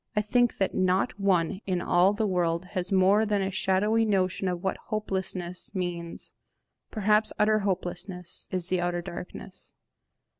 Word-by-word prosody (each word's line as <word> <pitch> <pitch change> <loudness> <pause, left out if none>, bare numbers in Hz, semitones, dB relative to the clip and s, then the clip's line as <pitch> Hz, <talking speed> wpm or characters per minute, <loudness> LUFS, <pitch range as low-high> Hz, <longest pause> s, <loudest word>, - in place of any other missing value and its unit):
I 210 - +3
think 240 +3 +2
that 195 - 0
not 190 +4 +1
one 190 -1 +1
in 185 -2 +1
all 175 +2 +4
the 215 +1 -1
world 175 -2 0
has 185 -1 -2
more 195 +3 +5
than 205 -2 +1
a 190 - -2
shadowy 195 +4 +2
notion 190 -3 +1
of 180 -1 -2
what 190 - -1
hopelessness 190 -4 -4
means. 175 -2 -4 0.6
Perhaps 215 0 +2
utter 215 0 +3
hopelessness 180 -2 -4
is 185 -1 -3
the 185 -1 +1
outer 175 0 -1
darkness. 180 +2 -9
190 Hz, 150 wpm, -27 LUFS, 180-210 Hz, 0.6 s, more